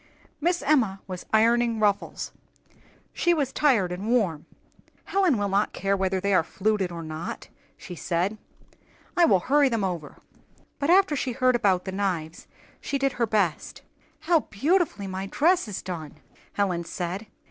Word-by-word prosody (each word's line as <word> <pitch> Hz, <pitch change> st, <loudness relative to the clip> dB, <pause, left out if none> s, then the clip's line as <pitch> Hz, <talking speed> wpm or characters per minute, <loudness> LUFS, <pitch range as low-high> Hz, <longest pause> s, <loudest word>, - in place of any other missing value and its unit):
Miss 345 Hz, +3 st, 0 dB
Emma 245 Hz, -10 st, +2 dB
was 185 Hz, -2 st, -7 dB
ironing 230 Hz, +1 st, +3 dB
ruffles; 205 Hz, -2 st, 0 dB, 0.8 s
she 345 Hz, 0 st, +2 dB
was 275 Hz, -4 st, -1 dB
tired 230 Hz, -12 st, +2 dB
and 185 Hz, +4 st, -5 dB
warm. 200 Hz, -11 st, 0 dB, 0.6 s
"Helen 375 Hz, -, +2 dB
will 205 Hz, -1 st, 0 dB
not 200 Hz, +2 st, +1 dB
care 195 Hz, +1 st, 0 dB
whether 190 Hz, -1 st, 0 dB
they 200 Hz, +1 st, 0 dB
are -, -, +5 dB
fluted 195 Hz, +2 st, -1 dB
or 170 Hz, -1 st, -6 dB
not," 155 Hz, +1 st, -6 dB, 0.3 s
she 180 Hz, -, -9 dB
said. 180 Hz, +5 st, -2 dB, 0.8 s
"I 350 Hz, -, +5 dB
will 190 Hz, -, +4 dB
hurry 285 Hz, +4 st, +3 dB
them 230 Hz, -4 st, -1 dB
over." 175 Hz, -5 st, -4 dB, 0.6 s
But 285 Hz, +2 st, -1 dB
after 370 Hz, -3 st, +5 dB
she 255 Hz, -2 st, -2 dB
heard 255 Hz, +1 st, +2 dB
about 190 Hz, -6 st, +2 dB
the 190 Hz, -, -4 dB
knives, 180 Hz, -5 st, -3 dB, 0.3 s
she 280 Hz, -, -2 dB
did 275 Hz, 0 st, +1 dB
her 235 Hz, -2 st, -1 dB
best. 200 Hz, -7 st, -1 dB, 0.4 s
"How 335 Hz, 0 st, +3 dB
beautifully 295 Hz, -, 0 dB
my 190 Hz, 0 st, -4 dB
dress 335 Hz, -, +2 dB
is 205 Hz, -, -5 dB
done!" 165 Hz, -5 st, -6 dB, 0.4 s
Helen 185 Hz, -4 st, 0 dB
said. 180 Hz, +5 st, -5 dB
205 Hz, 160 wpm, -26 LUFS, 185-270 Hz, 0.8 s, are